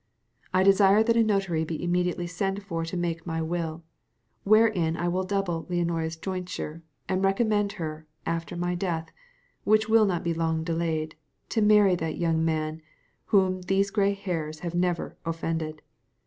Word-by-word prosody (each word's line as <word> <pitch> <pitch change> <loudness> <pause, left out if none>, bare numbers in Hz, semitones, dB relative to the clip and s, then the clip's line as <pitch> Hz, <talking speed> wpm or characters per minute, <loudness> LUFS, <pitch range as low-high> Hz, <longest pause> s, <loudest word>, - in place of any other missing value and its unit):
I 185 0 +3
desire 195 +2 +6
that 230 0 +2
a 230 - +5
notary 195 -6 +1
be 160 +1 -4
immediately 175 0 0
sent 195 +3 -2
for 165 -5 -3
to 165 +2 -4
make 170 -1 -3
my 165 -1 -2
will, 165 0 -3 0.6
wherein 205 -6 +3
I 175 - -1
will 180 +2 0
double 185 -4 -2
Leonora's 165 -2 -1
jointure, 180 -2 -5 0.3
and 185 +1 0
recommend 205 +1 +2
her, 155 -4 -6 0.2
after 165 0 -3
my 175 +1 -1
death, 175 -3 -3 0.5
which 215 +1 +3
will 220 -1 +5
not 175 -3 -1
be 170 - 0
long 160 -1 0
delayed, 160 -2 -2 0.3
to 220 - 0
marry 210 -2 +6
that 160 -2 -3
young 165 -2 +1
man 155 0 -1 0.4
whom 185 -2 +2
these 195 +2 +1
gray 200 -1 +2
hairs 160 -6 -4
have 170 -1 -4
never 175 -1 -1
offended. 165 -1 -3
175 Hz, 160 wpm, -27 LUFS, 165-195 Hz, 0.6 s, desire